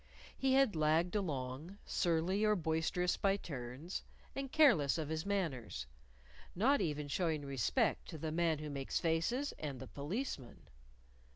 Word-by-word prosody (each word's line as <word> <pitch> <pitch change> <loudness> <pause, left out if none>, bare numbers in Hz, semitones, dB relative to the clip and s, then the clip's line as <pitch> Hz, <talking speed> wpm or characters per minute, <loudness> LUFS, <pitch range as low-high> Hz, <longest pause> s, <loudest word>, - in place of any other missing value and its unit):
He 265 -1 +2
had 265 -7 +4
lagged 160 +4 +2
along, 150 -1 -3
surly 175 +4 +1
or 210 0 +4
boisterous 165 +1 0
by 195 0 +2
turns, 140 +1 -5 0.3
and 270 -1 -4
careless 200 - +5
of 155 -2 -3
his 160 +4 -2
manners; 140 - -2 0.7
not 265 +10 +4
even 150 -2 -1
showing 155 -1 0
respect 135 -6 +1
to 160 - -6
the 155 +1 -3
Man 165 -1 +2
Who 150 0 -5
Makes 135 -1 -2
Faces 175 - +1
and 140 -4 -4
the - - -6
Policeman! 145 - -5
160 Hz, 145 wpm, -36 LUFS, 145-195 Hz, 0.7 s, careless